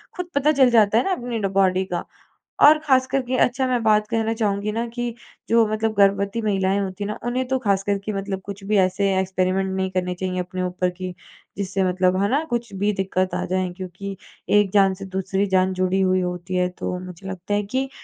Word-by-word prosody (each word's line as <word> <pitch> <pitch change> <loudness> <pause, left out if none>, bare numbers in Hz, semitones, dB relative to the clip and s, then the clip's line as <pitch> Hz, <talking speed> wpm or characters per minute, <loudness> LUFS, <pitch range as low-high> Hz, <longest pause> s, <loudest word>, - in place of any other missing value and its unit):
खुद 360 -1 -5
पता 285 +2 +3
चल 265 -4 +5
जाता 220 -2 +4
है 240 - +3
ना 390 - -1
अपनी 245 -9 -2
ड 205 - -2
बॉडी 190 0 +3
का 175 - -2 0.6
और 305 +1 +7
खास 260 -2 +4
कर 270 +1 0
के 255 +1 -2
अच्छा 260 +1 0
मैं 250 -2 +1
बात 215 -1 +3
कर 230 - -2
कहना 225 0 0
चाहूँगी 210 -2 -1
ना 230 +2 -2
कि 240 -1 -2 0.4
जो 230 0 +5
मतलब 215 +1 -1
गर्भवती 200 +2 +2
महिलाएँ 195 -2 +1
होती 195 +1 -4
हैं - - -3
ना, - - -5
उन्हें 255 +1 -1
तो 265 0 0
खासकर 200 -3 +1
के 215 - -2
मतलब 195 -1 -3
कुछ 200 0 -8
भी 210 +1 +1
ऐसे 190 +1 +2
एक्सपेरिमेंट 190 0 0
नहीं 190 0 -1
करने 180 -1 -1
चाहिए 185 0 -3
अपने 180 +1 -4
ऊपर, 180 0 -1
की 180 0 -6 0.4
जिससे 195 -1 -1
मतलब 185 0 +2
है 200 - +2
ना 285 +4 +2
कुछ 235 -3 -3
भी 205 +2 0
दिक्कत 185 -2 -1
आ - - -2
जाए। 185 0 -1
क्योंकि 190 +1 -6 0.4
एक 200 -2 +1
जान 195 -2 +5
से 195 +1 -8
दूसरी 190 +1 -1
जान 185 0 +2
जुड़ी 185 +1 +1
हुई 185 0 +2
होती 180 0 -4
है, 180 0 +2
तो 180 0 -4
मुझे 185 +1 -9
लगता 190 +1 -5
है 205 0 +1
कि 260 +6 -2
195 Hz, 225 wpm, -22 LUFS, 185-225 Hz, 0.6 s, और